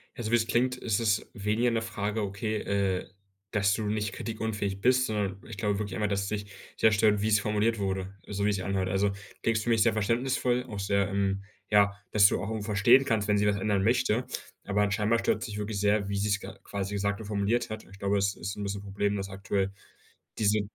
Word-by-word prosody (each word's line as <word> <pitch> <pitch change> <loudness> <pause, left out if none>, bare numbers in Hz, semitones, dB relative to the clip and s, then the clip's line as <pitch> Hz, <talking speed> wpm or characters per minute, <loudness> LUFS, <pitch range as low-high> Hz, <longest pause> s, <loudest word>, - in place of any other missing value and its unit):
Also, 115 -2 -4
wie - - +6
es 115 -1 +1
klingt, 125 +2 +2
ist 115 -4 0
es 110 -2 +1
weniger 110 +3 +1
'ne 115 -1 0
Frage, 105 -1 -2
okay, 105 +2 -2
äh, 100 -4 -1 0.4
dass 100 -2 +2
du 110 - -1
nicht 105 -1 -1
kritikunfähig 105 -3 -3
bist, 130 +2 +4
sondern 100 -3 -2
ich 115 - -8
glaube 105 -1 0
wirklich 105 -1 -4
einfach, 105 -1 0
dass 100 -1 0
es - - -3
dich 105 0 -4 0.2
sehr 110 - +4
stört, 105 -1 +3
wie 105 - +1
es 105 -1 +5
formuliert 105 +2 +1
wurde, 95 -1 -2
so 100 0 -2
wie 105 - +3
sich 95 -2 -2
anhört. 95 0 -1
Also, 100 +2 +2
du 100 - -5 0.3
klingst 110 -1 +1
für 120 - -2
mich 115 -2 +4
sehr 115 - +3
verständnisvoll, 120 +3 +1
auch 105 - -5
sehr, 100 0 +1
ähm, 100 0 0 0.3
ja 100 -1 +5 0.2
dass 100 -2 +7
du - - 0
auch 95 - -4
irgendwo 110 -2 -3
verstehen 110 +6 +5
kannst, 110 -6 +1
wenn 105 -1 +3
sie 105 0 +2
was 100 0 +2
ändern 100 -1 +1
möchte. 120 +1 +2 0.4
Aber 105 0 +1
scheinbar 105 +3 +2
stört - - 0
es - - -3
dich 105 -2 -6
wirklich 105 0 -3
sehr, 105 0 +2
wie 100 - -1
sie's 100 0 +1
g - - -9 0.2
quasi 100 0 -4
gesagt 100 0 -1
und - - -7
formuliert 105 +3 0
hat. 110 0 -6
Ich 95 - -14
glaube, 100 0 +1
es 100 -1 +1
ist 95 +3 -5
'n 105 - -4
bisschen 100 0 -3
'n - - -13
Problem, 100 +1 -1
dass 95 -1 -3
aktuell 95 0 -1 0.7
diese 105 0 +3
105 Hz, 235 wpm, -28 LUFS, 100-110 Hz, 0.7 s, dass